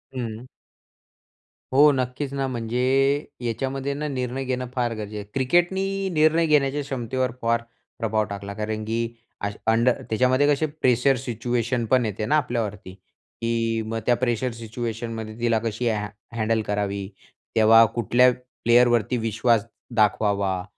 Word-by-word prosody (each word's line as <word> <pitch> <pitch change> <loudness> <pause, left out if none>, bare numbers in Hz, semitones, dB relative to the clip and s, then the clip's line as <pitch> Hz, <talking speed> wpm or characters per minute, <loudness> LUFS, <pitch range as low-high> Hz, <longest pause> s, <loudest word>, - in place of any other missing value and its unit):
हं. 115 -1 -5 1.3
हो, 145 +2 +7
नक्कीच 130 +2 -2
ना. 135 -1 -1
म्हणजे 120 -1 -3 0.6
याच्यामध्ये 135 +4 -2
ना, 150 +2 -3
निर्णय 130 -1 -3
घेणं 125 0 -2
फार 120 -2 0
गरजेचं 105 -1 -6
आहे. 105 - -5
क्रिकेटनी 190 +8 +1
निर्णय 155 +1 +4
घेण्याच्या 145 -1 +2
क्षमतेवर 130 -2 -2
फार 115 0 +1 0.4
प्रभाव 110 -2 +1
टाकला. 100 0 -6
कारण 110 +1 -3
की 115 +1 -2 0.5
अश 100 - -2
अंडर 115 +2 +3
त्याच्यामध्ये 130 +5 +3
कसे 145 +1 +2 0.2
प्रेशर 125 +2 +4
सिच्युएशन 120 0 -2
पण 130 -2 +4
येते 105 0 -3
ना, 150 +7 +3
आपल्यावरती. 110 -8 -3 0.5
की 115 -1 0
मग 115 +1 -3
त्या 120 - +4
प्रेशर 120 0 -1
सिच्युएशनमध्ये 115 -1 -5
तिला 115 -1 +2
कशी 115 +2 -2
ह 105 -2 -1 0.3
हँडल 110 0 +1
करावी. 100 -1 -2 0.5
तेव्हा 115 +1 +7
कुठल्या 120 +2 +4 0.3
प्लेयरवरती 120 0 +4
विश्वास 115 0 +1 0.3
दाखवावा. 100 -3 +1
120 Hz, 135 wpm, -24 LUFS, 110-130 Hz, 1.3 s, हो